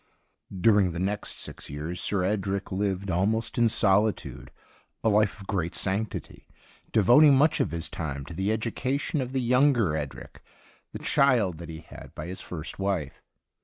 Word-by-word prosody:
During 100 Hz, -4 st, +4 dB
the 85 Hz, -, -4 dB
next 100 Hz, +3 st, -3 dB
six -, -, -8 dB
years 80 Hz, +5 st, -5 dB
Sir 100 Hz, -3 st, 0 dB
Edric 100 Hz, 0 st, -1 dB
lived, 95 Hz, 0 st, -1 dB
almost 110 Hz, +7 st, 0 dB
in 120 Hz, -1 st, +5 dB
solitude, 105 Hz, 0 st, +1 dB, 0.5 s
a 110 Hz, -, +3 dB
life 105 Hz, -1 st, +2 dB
of 95 Hz, -, -10 dB
great 90 Hz, -5 st, -2 dB
sanctity, 100 Hz, +2 st, -3 dB, 0.4 s
devoting 130 Hz, +8 st, +6 dB
much 150 Hz, +4 st, +3 dB
of -, -, +1 dB
his 85 Hz, +2 st, -4 dB
time 70 Hz, -4 st, -5 dB
to 85 Hz, -, -9 dB
the 95 Hz, +5 st, -1 dB
education 130 Hz, +6 st, -1 dB
of 125 Hz, -1 st, -4 dB
the 130 Hz, -1 st, 0 dB
younger 125 Hz, -, +3 dB
Edric, 75 Hz, -3 st, -6 dB, 0.5 s
the -, -, -6 dB
child 115 Hz, -, +2 dB
that 85 Hz, -2 st, -8 dB
he 80 Hz, 0 st, -7 dB
had -, -, -13 dB
by 75 Hz, -, -6 dB
his 90 Hz, +2 st, -7 dB
first 80 Hz, 0 st, -7 dB
wife. 95 Hz, -8 st, -2 dB
100 Hz, 165 wpm, -27 LUFS, 90-115 Hz, 0.5 s, devoting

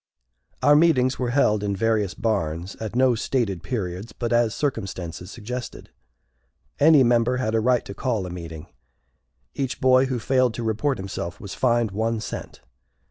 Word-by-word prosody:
Our 145 Hz, +2 st, +6 dB
meetings 140 Hz, -5 st, +3 dB
were 125 Hz, -2 st, -1 dB
held 115 Hz, -5 st, +2 dB
in 100 Hz, -1 st, -1 dB
various 105 Hz, -2 st, 0 dB
barns, 90 Hz, -5 st, -2 dB
at 110 Hz, +1 st, -6 dB
no 130 Hz, 0 st, +4 dB
stated 110 Hz, -5 st, -1 dB
periods, 100 Hz, -4 st, -4 dB
but 120 Hz, -1 st, -2 dB
as 120 Hz, -2 st, +2 dB
circumstances 95 Hz, -, -4 dB
suggested. 120 Hz, +3 st, -7 dB, 0.9 s
Any 150 Hz, -2 st, +6 dB
member 120 Hz, +1 st, +2 dB
had 110 Hz, -4 st, -1 dB
a 115 Hz, -, +3 dB
right 125 Hz, +1 st, +2 dB
to -, -, -7 dB
call 110 Hz, -4 st, -2 dB
a 90 Hz, -, -6 dB
meeting. 85 Hz, -3 st, -8 dB, 0.9 s
Each 135 Hz, -1 st, -3 dB
boy 130 Hz, 0 st, +4 dB
who 130 Hz, -1 st, -2 dB
failed 130 Hz, 0 st, +1 dB
to 120 Hz, -, -4 dB
report 115 Hz, +6 st, 0 dB
himself 95 Hz, -2 st, -5 dB
was 100 Hz, -, -7 dB
fined 120 Hz, -4 st, +1 dB
one 110 Hz, +3 st, -1 dB
cent. 110 Hz, -, -7 dB
115 Hz, 160 wpm, -24 LUFS, 100-130 Hz, 0.9 s, Our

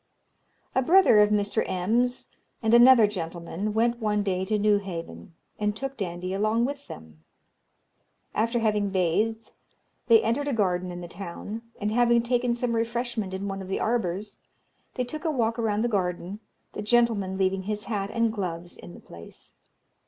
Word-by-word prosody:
"A 260 Hz, -, +2 dB
brother 335 Hz, -, +6 dB
of 210 Hz, 0 st, +5 dB
Mr. 205 Hz, -1 st, +1 dB
M.'s 230 Hz, +7 st, 0 dB, 0.4 s
and 220 Hz, +1 st, +2 dB
another 240 Hz, -1 st, +8 dB
gentleman 175 Hz, +1 st, -4 dB
went 235 Hz, +2 st, +1 dB
one 210 Hz, -2 st, 0 dB
day 185 Hz, -2 st, -1 dB
to 215 Hz, +2 st, 0 dB
Newhaven, 190 Hz, -, -2 dB, 0.2 s
and 210 Hz, 0 st, 0 dB
took 270 Hz, +3 st, -5 dB
Dandie 180 Hz, -3 st, -4 dB
along 215 Hz, +4 st, +1 dB
with 285 Hz, +1 st, -5 dB
them. 80 Hz, -1 st, -12 dB, 1.1 s
After 230 Hz, +3 st, 0 dB
having 210 Hz, -3 st, +1 dB
bathed, 195 Hz, +5 st, 0 dB, 0.6 s
they 230 Hz, -2 st, +6 dB
entered 245 Hz, +6 st, 0 dB
a 285 Hz, -, 0 dB
garden 185 Hz, -4 st, 0 dB
in 175 Hz, 0 st, -7 dB
the 175 Hz, -, -7 dB
town; 195 Hz, +5 st, -7 dB, 0.2 s
and 210 Hz, 0 st, -1 dB
having 235 Hz, 0 st, +3 dB
taken 240 Hz, 0 st, +1 dB
some 240 Hz, 0 st, -1 dB
refreshment 230 Hz, -3 st, -2 dB
in 190 Hz, +1 st, -4 dB
one 195 Hz, 0 st, -4 dB
of 190 Hz, -, -8 dB
the 195 Hz, -, -2 dB
arbours, 205 Hz, -3 st, -2 dB, 0.6 s
they 250 Hz, -, 0 dB
took 300 Hz, +5 st, -7 dB
a 330 Hz, -, 0 dB
walk 235 Hz, -5 st, 0 dB
around 215 Hz, -1 st, 0 dB
the -, -, +2 dB
garden, 185 Hz, -2 st, -2 dB, 0.3 s
the -, -, -5 dB
gentleman 210 Hz, -4 st, +1 dB
leaving 190 Hz, 0 st, +1 dB
his 210 Hz, +1 st, -3 dB
hat 205 Hz, -3 st, -2 dB
and 230 Hz, -1 st, +1 dB
gloves 175 Hz, -4 st, -5 dB
in 175 Hz, -, -11 dB
the -, -, -12 dB
place. 85 Hz, 0 st, -13 dB
210 Hz, 165 wpm, -26 LUFS, 190-235 Hz, 1.1 s, another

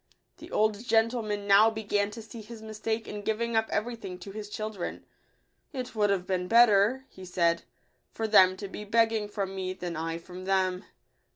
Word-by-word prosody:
The -, -, -12 dB
old 215 Hz, 0 st, +1 dB
gentleman 225 Hz, -3 st, +1 dB
now 200 Hz, +2 st, +7 dB
began 205 Hz, -2 st, -1 dB
to 225 Hz, +2 st, -9 dB
see 225 Hz, +1 st, -10 dB
his 220 Hz, +1 st, -11 dB
mistake 220 Hz, +1 st, -3 dB
in 210 Hz, -, -6 dB
giving 225 Hz, +2 st, -1 dB
up 220 Hz, 0 st, +2 dB
every 235 Hz, +3 st, -1 dB
thing 195 Hz, -5 st, -8 dB
to 200 Hz, -, -8 dB
his 210 Hz, 0 st, -7 dB
children. 215 Hz, -3 st, -5 dB, 0.3 s
" -, -, -45 dB
It 255 Hz, -3 st, -5 dB
would 210 Hz, -2 st, +2 dB
have 190 Hz, -2 st, 0 dB
been 180 Hz, -1 st, -1 dB
better," 230 Hz, +3 st, +5 dB
he 190 Hz, -, -13 dB
said, 170 Hz, -2 st, +1 dB, 0.3 s
" -, -, -45 dB
for 225 Hz, -, -1 dB
them 185 Hz, -3 st, +6 dB
to 200 Hz, -, -6 dB
be 210 Hz, -, -7 dB
begging 225 Hz, 0 st, +2 dB
from 200 Hz, -2 st, -3 dB
me, 185 Hz, -1 st, -3 dB
than 175 Hz, -2 st, -5 dB
I 165 Hz, +1 st, -3 dB
from 180 Hz, +2 st, -10 dB
them." 190 Hz, -1 st, +1 dB
210 Hz, 195 wpm, -28 LUFS, 190-225 Hz, 0.3 s, now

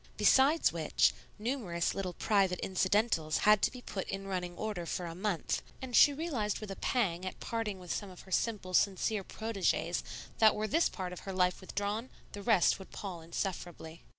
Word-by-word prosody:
Besides 280 Hz, -, +5 dB
which, 160 Hz, -3 st, +2 dB, 0.2 s
numerous 210 Hz, -7 st, -1 dB
little 185 Hz, -2 st, -3 dB
private 195 Hz, -3 st, +2 dB
incidentals 185 Hz, -4 st, +1 dB
had 210 Hz, -1 st, +5 dB
to -, -, +3 dB
be 250 Hz, -1 st, -10 dB
put 190 Hz, -, -4 dB
in 195 Hz, 0 st, -4 dB
running 180 Hz, -2 st, -3 dB
order 205 Hz, -6 st, -3 dB
for 180 Hz, -, -2 dB
a 165 Hz, -, -5 dB
month, 190 Hz, 0 st, -1 dB, 0.2 s
and 255 Hz, -2 st, -4 dB
she 290 Hz, -, +8 dB
realized 275 Hz, -9 st, -2 dB
with 215 Hz, -2 st, -7 dB
a -, -, -4 dB
pang 185 Hz, -9 st, 0 dB
at 185 Hz, -, -5 dB
parting 225 Hz, -4 st, -3 dB
with 180 Hz, -2 st, -5 dB
some 205 Hz, -, -4 dB
of 180 Hz, -, -12 dB
her 190 Hz, -, -16 dB
simple, 200 Hz, -3 st, -1 dB
sincere 200 Hz, +2 st, +2 dB
proteges 220 Hz, -1 st, -1 dB, 0.4 s
that 220 Hz, -1 st, +6 dB
were 215 Hz, -, -1 dB
this 330 Hz, +8 st, +3 dB
part 180 Hz, -2 st, -5 dB
of 180 Hz, -, -7 dB
her 195 Hz, -, -6 dB
life 180 Hz, 0 st, +1 dB
withdrawn, 205 Hz, +5 st, -3 dB, 0.2 s
the 205 Hz, -, -7 dB
rest 200 Hz, -5 st, +3 dB
would 190 Hz, -, -11 dB
pall 185 Hz, -5 st, -6 dB
insufferably. 170 Hz, -1 st, -5 dB
195 Hz, 185 wpm, -32 LUFS, 180-220 Hz, 0.4 s, she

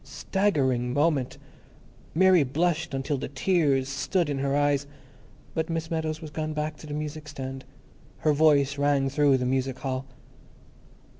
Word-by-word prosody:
Staggering 130 Hz, -11 st, 0 dB
moment! 145 Hz, -2 st, +1 dB, 0.8 s
Mary 185 Hz, 0 st, +6 dB
blushed 155 Hz, +2 st, 0 dB
until 135 Hz, +1 st, -2 dB
the -, -, -4 dB
tears 140 Hz, -2 st, +1 dB
stood 145 Hz, +4 st, 0 dB
in 135 Hz, -, -2 dB
her 140 Hz, 0 st, 0 dB
eyes, 145 Hz, -1 st, +1 dB, 0.7 s
but 160 Hz, +1 st, -2 dB
Miss 165 Hz, 0 st, -3 dB
Meadows 160 Hz, -1 st, -2 dB
was 155 Hz, -, -8 dB
gone 155 Hz, 0 st, -3 dB
back 150 Hz, 0 st, -2 dB
to 155 Hz, -, -11 dB
the 145 Hz, -, -5 dB
music 150 Hz, 0 st, -5 dB
stand; 135 Hz, -2 st, -6 dB, 0.6 s
her 155 Hz, -, +5 dB
voice 145 Hz, -2 st, +3 dB
rang 145 Hz, -1 st, +2 dB
through 140 Hz, -1 st, +3 dB
the 125 Hz, -, -2 dB
music 130 Hz, 0 st, -1 dB
hall. 130 Hz, 0 st, -4 dB
145 Hz, 150 wpm, -26 LUFS, 135-155 Hz, 0.8 s, Mary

